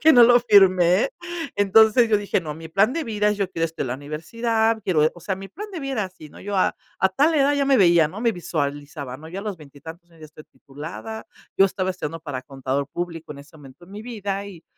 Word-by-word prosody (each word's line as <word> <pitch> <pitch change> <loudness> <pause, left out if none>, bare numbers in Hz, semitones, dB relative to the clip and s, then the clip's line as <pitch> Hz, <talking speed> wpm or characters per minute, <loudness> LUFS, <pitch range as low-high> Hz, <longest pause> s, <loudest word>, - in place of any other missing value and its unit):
que 315 +1 +6
no 245 - +8
lo 245 +1 +6
firmé. 190 - +4 0.5
Entonces, 220 +4 +5
yo 215 - +5
dije: 205 -2 -1
"No, 155 -3 -6
mi 160 +1 -10
plan 200 +8 +2
de 330 +2 -2
vida, 210 -3 0
yo 200 -2 -2
quiero 165 -3 -1
estudiar 165 -2 -5
en - - -5
la 125 - -2
universidad, 220 - -1
quiero", 155 -4 +3
o 175 - -14
sea, 190 +2 -3
mi 195 - -8
plan 415 - -8
de 345 - -5
vida 275 0 -4
era 215 -4 -1
así, 180 -5 -11
¿no?, - - -14
yo 200 0 -4
a 185 - +2 0.3
a 190 - +4
tal 295 - +2
edad 285 -1 +3
ya 285 -1 +1
me 275 -1 +4
veía, 170 -4 +5
¿no?, 190 +7 -8
me 235 -1 +2
visualizaba, 145 - -4
¿no?, 155 +3 -12
ya 185 +4 -6
a - - -9
los 205 -3 -4
veintitantos 160 +4 -13
años 165 -1 -21
ya 155 - -10
estoy 155 0 -15
titulada, 160 +10 -9 0.3
yo 195 - +6
estaba 185 -1 -2
estudiando 165 -3 -5
para 145 -5 -6
contador 135 +1 -3
público 165 -1 -6
en 145 - -12
ese 145 +3 -17
momento 140 +3 -15
en 195 - -16
mi 210 +1 -8
vida, 205 -4 -4
y 175 -5 -12
185 Hz, 250 wpm, -23 LUFS, 155-220 Hz, 0.5 s, no